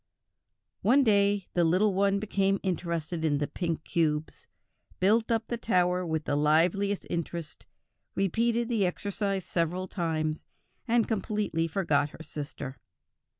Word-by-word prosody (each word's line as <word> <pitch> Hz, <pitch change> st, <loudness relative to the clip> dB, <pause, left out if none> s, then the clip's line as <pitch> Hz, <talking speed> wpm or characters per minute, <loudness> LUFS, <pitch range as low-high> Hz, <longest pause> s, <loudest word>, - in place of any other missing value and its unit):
One 260 Hz, +7 st, +5 dB
day 200 Hz, -3 st, +3 dB
the 175 Hz, -, +3 dB
little 185 Hz, +5 st, +3 dB
one 200 Hz, +1 st, +2 dB
became 195 Hz, -1 st, +1 dB
interested 170 Hz, -3 st, -2 dB
in 150 Hz, -3 st, +2 dB
the 145 Hz, -, 0 dB
pink 165 Hz, +1 st, -3 dB
cubes, 155 Hz, -2 st, -1 dB, 0.5 s
built 220 Hz, +4 st, +3 dB
up 225 Hz, -1 st, +1 dB
the 235 Hz, -, -3 dB
tower 180 Hz, -4 st, +2 dB
with 160 Hz, -2 st, -2 dB
the 145 Hz, -, 0 dB
liveliest 170 Hz, +7 st, +2 dB
interest, 170 Hz, -1 st, -5 dB, 0.5 s
repeated 230 Hz, +5 st, +1 dB
the 220 Hz, -6 st, +1 dB
exercise 195 Hz, 0 st, -2 dB
several 175 Hz, +2 st, -1 dB
times, 160 Hz, -4 st, -2 dB, 0.4 s
and 235 Hz, -1 st, +3 dB
completely 210 Hz, -6 st, -1 dB
forgot 155 Hz, -5 st, +1 dB
her 160 Hz, -, -11 dB
sister. 140 Hz, -3 st, -6 dB
185 Hz, 130 wpm, -28 LUFS, 160-205 Hz, 0.5 s, One